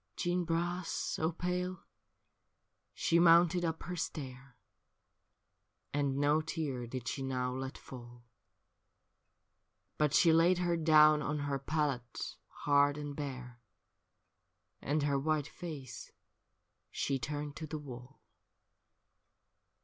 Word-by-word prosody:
Jeanne 175 Hz, 0 st, 0 dB
Bras, 175 Hz, +2 st, -1 dB
so 160 Hz, +1 st, -1 dB
pale, 180 Hz, +1 st, -3 dB, 1.1 s
she 170 Hz, -, +2 dB
mounted 170 Hz, +1 st, +6 dB
up 160 Hz, -1 st, -2 dB
her 180 Hz, -, -4 dB
stair. 135 Hz, -5 st, -6 dB, 1.4 s
And 140 Hz, -2 st, 0 dB
no 145 Hz, +2 st, +3 dB
tear 150 Hz, -6 st, -3 dB
did 120 Hz, 0 st, -6 dB
she 135 Hz, -, -3 dB
now 125 Hz, -1 st, -1 dB
let 130 Hz, +1 st, -5 dB
fall; 120 Hz, -2 st, -11 dB, 1.8 s
But 150 Hz, -1 st, +2 dB
she 170 Hz, -5 st, +6 dB
laid 170 Hz, +3 st, +5 dB
her 175 Hz, -1 st, +1 dB
down 155 Hz, -2 st, +6 dB
on 150 Hz, +1 st, -2 dB
her 140 Hz, -1 st, -1 dB
pallet 135 Hz, -4 st, -2 dB, 0.3 s
hard 145 Hz, 0 st, +4 dB
and 145 Hz, -1 st, -5 dB
bare, 125 Hz, -4 st, -6 dB, 1.2 s
And 150 Hz, +1 st, 0 dB
her 140 Hz, -1 st, +1 dB
white 155 Hz, 0 st, 0 dB
face 145 Hz, -9 st, -8 dB, 0.8 s
she 135 Hz, -1 st, -1 dB
turned 145 Hz, +1 st, -4 dB
to 155 Hz, -, -6 dB
the 155 Hz, -, -4 dB
wall. 130 Hz, -3 st, -10 dB
150 Hz, 110 wpm, -33 LUFS, 135-165 Hz, 1.8 s, mounted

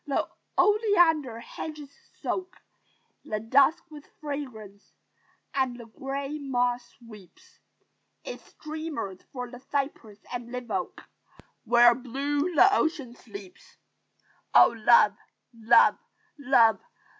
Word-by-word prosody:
The 280 Hz, -, 0 dB, 0.3 s
oleander 350 Hz, -, +3 dB
hedges 295 Hz, +1 st, -8 dB, 0.3 s
soak 370 Hz, 0 st, -3 dB, 0.7 s
The 215 Hz, -, -3 dB
dusk 275 Hz, +9 st, +3 dB
with 295 Hz, -1 st, -12 dB
fragrance: 250 Hz, -9 st, -8 dB, 0.6 s
and 260 Hz, -3 st, -1 dB
the 235 Hz, -, -9 dB
gray 275 Hz, +5 st, -5 dB
moss 245 Hz, -3 st, -2 dB
sweeps 235 Hz, -, -17 dB, 0.6 s
Its -, -, -8 dB
streamers 305 Hz, -, -6 dB
from 250 Hz, -2 st, -6 dB
the 245 Hz, -, -10 dB
cypress 270 Hz, -6 st, -4 dB, 0.2 s
and 240 Hz, -1 st, -6 dB
live 250 Hz, -2 st, -6 dB
oak 185 Hz, -3 st, -4 dB, 0.6 s
Where 240 Hz, +1 st, +6 dB
blue 285 Hz, +7 st, -2 dB
the 395 Hz, +6 st, +6 dB
ocean 305 Hz, -10 st, -1 dB
sleeps. 200 Hz, -6 st, -13 dB, 0.8 s
"Oh, -, -, +7 dB
love, 215 Hz, -2 st, +5 dB, 0.4 s
love, 225 Hz, -1 st, +4 dB, 0.4 s
love!" 235 Hz, -7 st, +4 dB
260 Hz, 105 wpm, -27 LUFS, 230-295 Hz, 0.8 s, Oh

